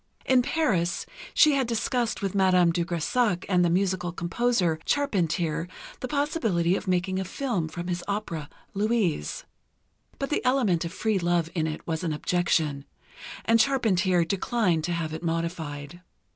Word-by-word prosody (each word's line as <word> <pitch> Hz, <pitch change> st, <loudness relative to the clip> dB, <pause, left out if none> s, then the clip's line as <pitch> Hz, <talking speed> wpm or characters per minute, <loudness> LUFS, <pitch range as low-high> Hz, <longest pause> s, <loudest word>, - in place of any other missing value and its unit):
In 260 Hz, -1 st, +4 dB
Paris, 205 Hz, -, 0 dB, 0.3 s
she 305 Hz, -, +7 dB
had 270 Hz, -3 st, +1 dB
discussed 235 Hz, -1 st, -1 dB
with 195 Hz, -, -1 dB
Madame 185 Hz, -3 st, +4 dB
de 170 Hz, 0 st, 0 dB
Grésac 180 Hz, +4 st, 0 dB
and 180 Hz, -2 st, +3 dB
the 175 Hz, -, +3 dB
musical 180 Hz, 0 st, 0 dB
composer, 175 Hz, -1 st, 0 dB
Charpentier, 170 Hz, -, 0 dB, 0.3 s
the 255 Hz, -, -4 dB
possibility 230 Hz, -, +1 dB
of 200 Hz, -, -5 dB
making 185 Hz, +1 st, 0 dB
a -, -, -1 dB
film 190 Hz, -, -2 dB
from 175 Hz, +2 st, -6 dB
his 175 Hz, -1 st, -2 dB
opera, 185 Hz, -8 st, -3 dB, 0.2 s
"Louise," 205 Hz, -, 0 dB, 0.7 s
but 275 Hz, -, -3 dB
the -, -, 0 dB
element 250 Hz, -10 st, +2 dB
of 165 Hz, -, -4 dB
free 215 Hz, +1 st, 0 dB
love 170 Hz, -1 st, 0 dB
in 160 Hz, -3 st, 0 dB
it 155 Hz, 0 st, -5 dB
was 160 Hz, +1 st, -2 dB
an 165 Hz, -3 st, -1 dB
objection, 155 Hz, -3 st, 0 dB, 0.6 s
and 230 Hz, 0 st, +4 dB
Charpentier 190 Hz, -10 st, +2 dB
declined 185 Hz, -2 st, 0 dB
to 175 Hz, -, -2 dB
have 160 Hz, -2 st, -3 dB
it 160 Hz, -, -5 dB
modified. 165 Hz, -2 st, -4 dB
180 Hz, 155 wpm, -26 LUFS, 170-225 Hz, 0.7 s, she